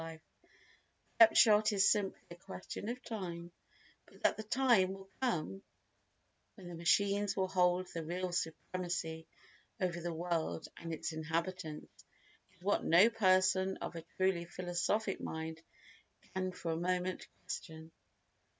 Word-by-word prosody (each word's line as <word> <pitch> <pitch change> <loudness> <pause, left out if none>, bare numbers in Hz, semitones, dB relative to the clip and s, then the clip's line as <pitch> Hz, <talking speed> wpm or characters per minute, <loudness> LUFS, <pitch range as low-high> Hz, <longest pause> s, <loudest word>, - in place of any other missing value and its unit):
The 165 -1 -7 1.1
upshot 215 -1 +5
is 195 -1 +4
simply 195 -1 +2
a - - -7
question 195 +3 -7
of 250 +1 -5
time, 175 -6 -5 0.6
but - - -19
that - - +4
the - - -5
time 220 -4 +3
will 195 0 -12
come 195 -6 -1 0.9
when 190 -4 -11
the 175 - -7
machines 200 +5 +2
will 190 -1 +2
hold 180 -1 +2
the 165 -2 -6
real 180 +3 -3
supremacy 165 -1 -3 0.5
over 175 -3 -1
the 175 0 -2
world 165 -1 -2
and 165 -1 -6
its 160 +1 -3
inhabitants 160 0 -4 0.5
is - - -28
what 205 +2 +1
no 185 +8 +6
person 190 -2 +3
of - - -6
a 165 - -5 0.2
truly 185 -2 +2
philosophic 185 +4 -1
mind 160 0 -5 0.7
can 185 -1 -1
for 170 -2 -4
a 160 - -1
moment 180 +1 -1 0.2
question. 160 0 -7
185 Hz, 135 wpm, -34 LUFS, 170-195 Hz, 1.1 s, no